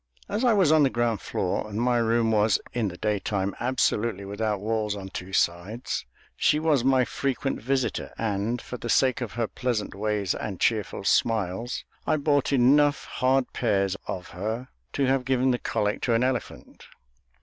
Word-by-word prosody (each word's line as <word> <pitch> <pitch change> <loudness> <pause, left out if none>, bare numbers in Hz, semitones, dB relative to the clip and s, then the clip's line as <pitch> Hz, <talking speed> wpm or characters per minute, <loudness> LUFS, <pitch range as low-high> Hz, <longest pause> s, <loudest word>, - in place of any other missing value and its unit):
As 210 +5 -2
I 245 - +5
was 190 -7 +4
on 155 -1 +5
the 140 - +5
ground 120 -4 0
floor, 95 +3 -2
and 105 +1 -4
my 120 0 +2
room 115 0 +2
was, 105 -1 +3
in 115 -3 0
the 90 -2 -6
daytime, 100 -1 -1
absolutely 115 -4 0
without 105 +1 -2
walls 105 0 -1
on 95 -1 -7
two 95 0 -7
sides, 95 - -1 0.3
she 150 - +3
was 155 -5 +2
my 130 -1 +4
frequent 135 +1 -2
visitor, 130 +1 -1
and, 110 +2 -1
for 125 - -6
the 120 - -6
sake 130 +2 +3
of 120 - -4
her 120 -1 0
pleasant 120 -1 -2
ways 105 -1 -1
and 100 -4 -5
cheerful 105 -4 0
smiles, 110 +2 0 0.2
I 155 - +3
bought 145 -2 +1
enough 140 +3 +4
hard 130 0 +1
pears 100 -5 +1
of 90 -2 -5
her 110 +7 -4 0.2
to 140 - +1
have 130 0 +2
given 130 0 +2
the 125 - 0
colic 105 0 -1
to 120 - +2
an 115 - +2
elephant. 130 -3 -4
115 Hz, 175 wpm, -26 LUFS, 105-130 Hz, 0.3 s, I